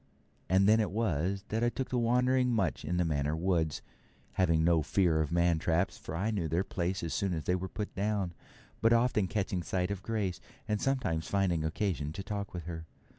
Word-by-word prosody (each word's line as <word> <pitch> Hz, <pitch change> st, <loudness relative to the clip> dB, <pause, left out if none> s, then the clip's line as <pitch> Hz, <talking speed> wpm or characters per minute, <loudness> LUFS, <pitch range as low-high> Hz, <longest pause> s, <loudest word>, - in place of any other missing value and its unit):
And 95 Hz, +2 st, +4 dB
then 110 Hz, +1 st, +6 dB
it 110 Hz, -, +1 dB
was 95 Hz, -2 st, 0 dB
that 110 Hz, +2 st, 0 dB
I 120 Hz, -, +4 dB
took 125 Hz, +3 st, -4 dB
to 125 Hz, -, 0 dB
wandering 125 Hz, +2 st, +3 dB
much 100 Hz, -9 st, 0 dB
in 90 Hz, -, -1 dB
the 90 Hz, -, +2 dB
Manor 75 Hz, -1 st, 0 dB
woods, 80 Hz, -3 st, 0 dB, 0.5 s
having 85 Hz, -4 st, +2 dB
no 85 Hz, -1 st, +4 dB
fear 85 Hz, -1 st, +2 dB
of 75 Hz, -, -2 dB
man 85 Hz, -1 st, +3 dB
traps, 85 Hz, +1 st, +1 dB
for 80 Hz, -, -7 dB
I 100 Hz, +6 st, 0 dB
knew 95 Hz, -7 st, -1 dB
their 85 Hz, +4 st, +1 dB
place 90 Hz, -1 st, -2 dB
as 80 Hz, -3 st, -2 dB
soon 90 Hz, +5 st, 0 dB
as 80 Hz, -, -3 dB
they 90 Hz, -, +1 dB
were 95 Hz, +1 st, -2 dB
put 105 Hz, +2 st, -5 dB
down, 100 Hz, -3 st, -1 dB, 0.5 s
but 115 Hz, +1 st, +5 dB
often 115 Hz, -4 st, +3 dB
catching 95 Hz, -4 st, -1 dB
sight 90 Hz, +2 st, -1 dB
of 100 Hz, -2 st, -3 dB
Grace, 100 Hz, -4 st, -2 dB, 0.3 s
and 105 Hz, -1 st, 0 dB
sometimes 130 Hz, -13 st, 0 dB
finding 95 Hz, -5 st, +1 dB
occasion 80 Hz, -2 st, -1 dB
to 95 Hz, +2 st, -5 dB
talk 100 Hz, 0 st, -4 dB
with 90 Hz, -2 st, -6 dB
her. 80 Hz, 0 st, -6 dB
95 Hz, 210 wpm, -31 LUFS, 85-105 Hz, 0.5 s, then